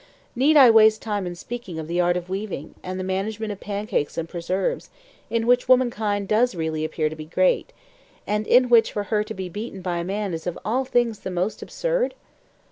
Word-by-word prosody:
Need 290 Hz, +5 st, +4 dB
I 260 Hz, -5 st, +9 dB
waste 220 Hz, -1 st, +6 dB
time 205 Hz, -4 st, -2 dB
in 175 Hz, -, -5 dB
speaking 210 Hz, -3 st, -7 dB
of 160 Hz, -1 st, -5 dB
the 175 Hz, +2 st, 0 dB
art 175 Hz, 0 st, +2 dB
of 175 Hz, 0 st, -6 dB
weaving, 190 Hz, -5 st, -5 dB
and 185 Hz, 0 st, -5 dB
the -, -, -2 dB
management 205 Hz, +3 st, -2 dB
of 200 Hz, -, -7 dB
pancakes 205 Hz, -7 st, -3 dB
and 165 Hz, -1 st, -2 dB
preserves, 180 Hz, +2 st, -2 dB, 0.4 s
in 230 Hz, -1 st, 0 dB
which 245 Hz, +1 st, +3 dB
womankind 220 Hz, -6 st, +2 dB
does 225 Hz, +1 st, +2 dB
really 160 Hz, -2 st, -2 dB
appear 155 Hz, 0 st, -1 dB
to 155 Hz, -, -5 dB
be 155 Hz, -1 st, -8 dB
great, 185 Hz, -, +1 dB, 0.5 s
and 210 Hz, +1 st, -1 dB
in 250 Hz, 0 st, +5 dB
which 235 Hz, -2 st, +5 dB
for 205 Hz, -, -2 dB
her 210 Hz, 0 st, +3 dB
to 215 Hz, -, -7 dB
be 190 Hz, -1 st, -4 dB
beaten 195 Hz, +1 st, -7 dB
by 175 Hz, -1 st, -1 dB
a 170 Hz, -, -2 dB
man 195 Hz, +1 st, -3 dB
is 160 Hz, +1 st, -5 dB
of 175 Hz, -, -3 dB
all 255 Hz, +5 st, 0 dB
things 240 Hz, -4 st, +1 dB
the -, -, -6 dB
most 180 Hz, +3 st, -2 dB
absurd? -, -, -1 dB
205 Hz, 210 wpm, -23 LUFS, 180-230 Hz, 0.5 s, I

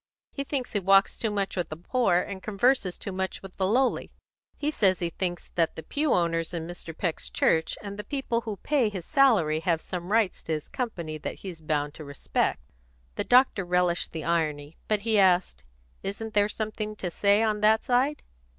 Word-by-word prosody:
He 275 Hz, -, -4 dB
thinks 270 Hz, -3 st, -3 dB
he 205 Hz, -, +2 dB
walks 195 Hz, +1 st, +4 dB
too 225 Hz, -, -2 dB
much 200 Hz, -2 st, -2 dB
with 180 Hz, -2 st, -2 dB
the 155 Hz, -, -5 dB
poor, 205 Hz, +1 st, +1 dB
and 195 Hz, 0 st, -6 dB
converses 215 Hz, -2 st, +1 dB
too 200 Hz, -, -5 dB
much 190 Hz, +1 st, -3 dB
with 195 Hz, -1 st, -11 dB
the 190 Hz, -, +1 dB
lowly. 250 Hz, +5 st, +1 dB, 0.5 s
He 300 Hz, +1 st, -1 dB
says 190 Hz, -10 st, +3 dB
he 170 Hz, -1 st, -2 dB
thinks 175 Hz, 0 st, -4 dB
that 165 Hz, -2 st, +1 dB
the 160 Hz, -, -7 dB
pew 295 Hz, -1 st, 0 dB
owners 165 Hz, 0 st, +1 dB
in 165 Hz, -1 st, -3 dB
Mr. 170 Hz, -1 st, -8 dB
Peck's 170 Hz, -4 st, -2 dB
church 160 Hz, 0 st, +1 dB
and 200 Hz, 0 st, -7 dB
the -, -, -4 dB
people 265 Hz, -4 st, -2 dB
who 215 Hz, -3 st, -5 dB
pay 265 Hz, 0 st, +1 dB
his 190 Hz, -5 st, -6 dB
salary 200 Hz, -, +4 dB
have 165 Hz, -1 st, +1 dB
some 180 Hz, +2 st, -6 dB
rights 220 Hz, -4 st, +2 dB
to 160 Hz, -, -3 dB
his 155 Hz, -1 st, -4 dB
company 170 Hz, -11 st, -4 dB
that -, -, -6 dB
he's 175 Hz, -4 st, -7 dB
bound 150 Hz, -2 st, -1 dB
to 155 Hz, -, -9 dB
respect." 140 Hz, -1 st, -1 dB, 0.5 s
The -, -, -2 dB
doctor 250 Hz, -5 st, +4 dB
relished 180 Hz, -1 st, +1 dB
the 160 Hz, -2 st, -5 dB
irony, 155 Hz, -2 st, -1 dB
but 210 Hz, -2 st, +1 dB
he 220 Hz, -1 st, +2 dB
asked, 180 Hz, -, +3 dB, 0.4 s
"Isn't 215 Hz, +3 st, -5 dB
there 205 Hz, 0 st, +3 dB
something 215 Hz, 0 st, -4 dB
to 180 Hz, -4 st, -4 dB
say 200 Hz, +4 st, +3 dB
on 215 Hz, -1 st, 0 dB
that 220 Hz, +1 st, +4 dB
side?" 265 Hz, +4 st, +1 dB
195 Hz, 200 wpm, -27 LUFS, 170-220 Hz, 0.5 s, walks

